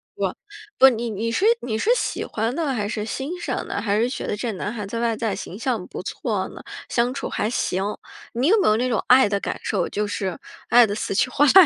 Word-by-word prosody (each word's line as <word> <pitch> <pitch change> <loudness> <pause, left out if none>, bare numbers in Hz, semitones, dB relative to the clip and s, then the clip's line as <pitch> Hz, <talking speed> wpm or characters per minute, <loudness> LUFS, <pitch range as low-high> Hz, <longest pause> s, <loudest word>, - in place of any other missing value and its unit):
不， - - -1 0.4
不， 265 - +9
你 235 -1 -2
你 225 +2 -2
是 375 - +1 0.2
你 220 -3 -2
是 415 - 0
喜 - - -2
欢 225 +2 -2
呢 315 -5 0
还 210 -4 -1
是 210 0 -3
欣 275 - -4
赏 - - -3
呢？ - - -2
还 205 -1 +1
是 240 +2 +2
觉 - - -4
得 - - -1
这 235 +1 -2
男 200 +2 -3
孩 210 -4 -5
在 230 +4 -4
外 230 -2 0
在 220 -4 -1
形 190 - -7
象 235 -7 -1
不 - - -6
错 - - -2
呢？ - - -10 0.3
相 240 +1 +1
处 275 - -4
还 215 - -1
行， 190 -5 -1 0.5
你 250 +5 +1
有 440 +4 +5
没 - - +3
有 215 - +4
那 250 +2 +1
种 230 -4 0
爱 260 -1 +7
的 200 -1 0
感 - - -3
受， - - 0
就 210 0 -1
是 190 -3 -3 0.3
爱 240 -1 +8
得 205 - -2
死 215 - -2
去 255 - +2
活 285 - +2
来 270 - +6
230 Hz, 270 characters per minute, -23 LUFS, 210-255 Hz, 0.5 s, 不